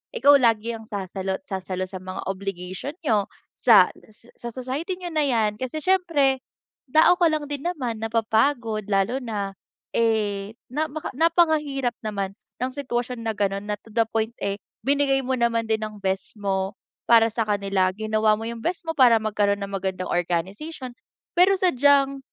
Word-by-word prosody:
ikaw 285 -12 +6
lagi 230 -2 +2
ang 220 -1 -9
sasalo 190 -2 -3
at 190 - -10
sasalo 185 -1 -4
sa 185 0 -8
mga 185 0 -6
obligation 195 - -5
niyo 215 -8 +2 0.3
,sa - - +7 0.5
sa 235 - -5
society 275 +9 -3
niyo 355 -2 -7
na 305 -2 +1
'yan 220 -4 +1
kasi 260 +4 -4
siyempre, 330 -8 +2 0.6
tao 350 +3 +6
ka 345 - +5
lang 310 -2 0
din 290 +3 -3
naman 250 -10 -3
napapagod 225 0 0
lalo 205 +6 +1
na 210 -5 -3 0.4
eh, 215 -2 0 0.2
namaka 310 +2 -3
napakahirap 300 -4 +2
naman 200 -2 -2 0.3
ng 255 - -1
sitwasyon 250 -3 -3
na 225 - +2
gano'n 200 -1 -1
na 210 - -1
to - - -20
the 230 - +4
point 225 0 0
eh, 200 0 0 0.3
binigay 280 -1 +3
mo 260 - -3
naman 235 -1 +1
din 220 0 +1
ng 215 0 -5
best 190 +2 -2
mo 195 -1 -1 0.4
para 230 -1 +6
sa 225 0 0
kanila 200 -2 +1
ginawa 215 0 +2
mo 225 - -5
yung 235 0 -5
best 350 +1 -2
mo - - +1
para 250 -4 +6
magkaroon 205 -2 0
ng 200 - -6
magandang 190 -1 -3
organization 195 - -3 0.4
pero 385 +2 +6
sadyang 280 -5 +3
230 Hz, 165 wpm, -24 LUFS, 200-280 Hz, 0.6 s, sa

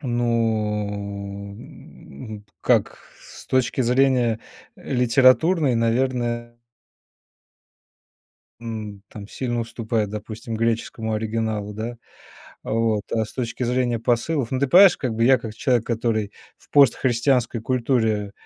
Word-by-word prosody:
Ну, 105 -5 -2
м, 105 - -12 0.2
как - - +1 0.2
с - - -14
точки 130 0 0
зрения, 125 -2 +2 0.4
э, - - -8
литературной, 130 +4 +4
наверное 120 0 -1 2.0
М, 110 -3 -7
там 105 -1 -10
сильно 120 -1 -3
уступает, 115 -2 -2
допустим, 110 +2 -6
греческому 115 -1 -1
оригиналу, 110 -1 -2
да, 115 +3 -5 0.7
вот. 110 -2 0
А 110 -1 +1
с - - -13
точки 125 0 -4
зрения 120 -1 0
посылов, 120 +3 0
ну, 130 - -1
ты 140 - +1
понимаешь, 185 +5 +7
как 125 -4 -3
бы 115 +1 +1
я, 130 +1 +6
как 115 -2 -8
человек, 120 0 +1
который 110 -3 -1 0.2
в - - -26
постхристианской 125 -3 +3
культуре, 110 -4 0
115 Hz, 115 wpm, -23 LUFS, 110-125 Hz, 2.0 s, понимаешь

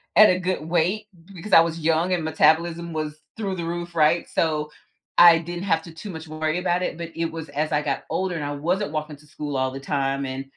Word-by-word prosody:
at 215 0 +8
a 185 0 +2
good 185 -2 -1
weight 180 +6 +1 0.2
b 195 - -16
because 190 +3 -7
I 165 - +10
was 165 0 -2
young 165 +3 +1
and 170 -3 0
metabolism 170 +2 +2
was 155 0 -4 0.2
through 195 -4 -2
the 170 -2 -4
roof, 175 0 -4
right? 160 +2 +3
So, 155 -2 0 0.5
I 170 -1 +9
didn't 175 +2 -6
have 165 -4 +1
to 165 - -11
too 200 +6 -9
much 160 -2 -8
worry 155 +2 -2
about 180 0 0
it, 160 - -3
but 170 -1 -6
it 165 0 -2
was 160 -1 -7
as 150 +2 -2
I 150 0 +2
got 140 -2 -2
older, 185 -1 -1
and 155 - -3
I 145 - -3
wasn't 175 +5 -1
walking 155 -1 -4
to 150 - -20
school 145 -1 -5
all 130 0 0
the 135 - -6
time, 140 0 -1
and 130 +1 -4
165 Hz, 245 wpm, -24 LUFS, 150-175 Hz, 0.5 s, I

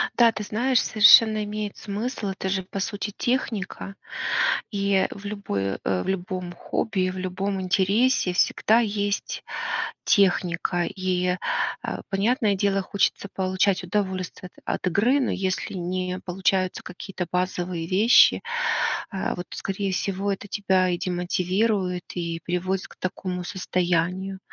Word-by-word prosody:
Да, 235 -2 +6
ты 215 -1 -5
знаешь, 240 +4 +2
совершенно 215 0 +7
имеет 210 0 -4
смысл, 210 +2 -4
это 190 0 -3
же, 190 0 0
по 195 +2 -6
сути, 205 +1 -3
техника, 225 -5 -2 0.8
и 200 -2 +2
в 200 - -10
любой 100 - -3
э, 95 -2 0
в - - -6
любом 180 -1 -3
хобби, 185 +2 -1
и - - 0
в 185 - -6
любом 190 +2 -2
интересе 195 +3 +2
всегда 220 +5 +3
есть 205 -2 -2 0.6
техника, 175 -3 +2
и, 180 -1 -1 0.5
э, - - -3
понятное 210 +2 +2
дело, 195 0 +1
хочется 200 +1 0
получать 190 0 +1
удовольствие 185 -1 -3 0.2
от - - 0
от - - -7
игры, 235 +10 +3
но 260 - 0
если 190 -1 -2
не 185 0 -3
получаются 185 0 0
какие-то 180 0 -6
базовые 180 -2 -1
вещи, 205 +7 +5 0.7
а 195 -3 -2
вот, 175 0 -6
скорее 195 0 -3
всего, 195 +1 -1
это 195 +1 -6
тебя 190 -2 +2
и 175 - -1
демотивирует, 180 +1 0
и 170 -1 -3
приводит 185 +2 -1
к - - -17
такому 180 0 -4
состоянию. 180 +1 -1
190 Hz, 135 wpm, -25 LUFS, 180-205 Hz, 0.8 s, совершенно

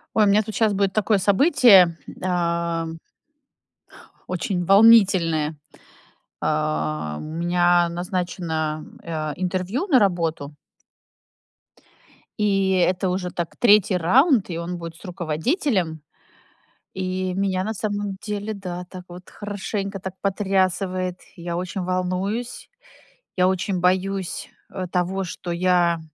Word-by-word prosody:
Ой, 215 -1 +5
у - - +3
меня 205 +2 +4
тут 220 0 -7
сейчас 220 -3 +2
будет 195 -1 0
такое 215 0 +2
событие, 200 - +5 0.3
ам 170 -2 -1 1.3
очень 180 0 -2
волнительное. 190 -6 +5 0.9
А, 75 0 -1
у - - -7
меня 175 +2 +2
назначено, 170 -3 -3 0.2
а, 155 -2 -3
интервью 185 - -2
на 275 -10 +4
работу 165 -7 -1 1.8
И 195 -2 +2
это 185 0 +1
уже, 180 0 -2
так, 170 -2 -5
3 210 -4 +5
раунд, 240 - +3
и 165 - -4
он 170 +1 -4
будет 165 -1 -8
с - - -17
руководителем. 175 - -1 0.9
И 185 0 -2
меня, 190 -1 0
на 220 +3 -3
самом 205 -2 -3
деле, 210 0 -4
да, 180 -3 -6
так 185 -1 -10
вот 180 +1 -12
хорошенько 200 -1 -5
так 190 0 -5
потрясывает. 185 -2 0 0.2
Я 170 0 -4
очень 180 +2 -3
волнуюсь. 185 +6 -3 0.7
Я 180 0 +4
очень 185 0 -1
боюсь, 185 +1 -1 0.2
а, 185 -1 -5
того, 180 +2 -1
что 175 0 -6
я 175 -1 +2
185 Hz, 115 wpm, -23 LUFS, 170-200 Hz, 1.8 s, Ой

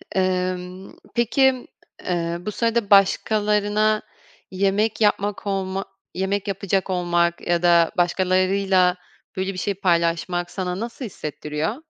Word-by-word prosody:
Emm, 185 0 -2 0.2
peki, 255 +2 +2 0.4
eee, 170 -1 -2
bu 210 +4 -4
sırada 230 -1 0
başkalarına 210 +1 +3 0.5
yemek 200 +4 0
yapmak 205 0 +1
olma 195 0 -2 0.3
yemek 190 +2 -2
yapacak 195 -1 -1
olmak 175 -1 0
ya 175 0 +1
da 170 -1 +5
başkalarıyla, 185 +1 +2 0.4
böyle 190 +1 -2
bir - - -9
şey 200 - -1
paylaşmak 175 -1 0
sana 185 -1 -3
nasıl 235 +3 -5
hissettiriyor? 155 -1 -4
190 Hz, 110 wpm, -22 LUFS, 180-205 Hz, 0.5 s, da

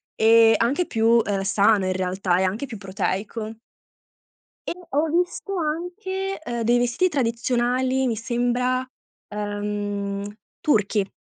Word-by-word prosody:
e 225 0 +6
anche 280 +10 +1
più, 225 0 -1 0.2
uhm, 200 -1 -1
sano 200 0 +3
in 185 - 0
realtà, 185 0 0
e - - +2
anche 205 +9 -1
più 225 -5 -8
proteico. 210 +3 -3 1.1
E - - -1 0.2
ho 295 +3 +1
visto 355 +4 -1
anche, 360 +4 -3
ehm, 240 -3 -3
dei 240 +2 +3
vestiti 245 +10 +2
tradizionali, 255 0 0
mi 230 -3 0
sembra, 245 +2 0 0.4
ehm, 205 -1 -3 0.3
turchi. 205 -7 +1
230 Hz, 125 wpm, -23 LUFS, 205-265 Hz, 1.1 s, e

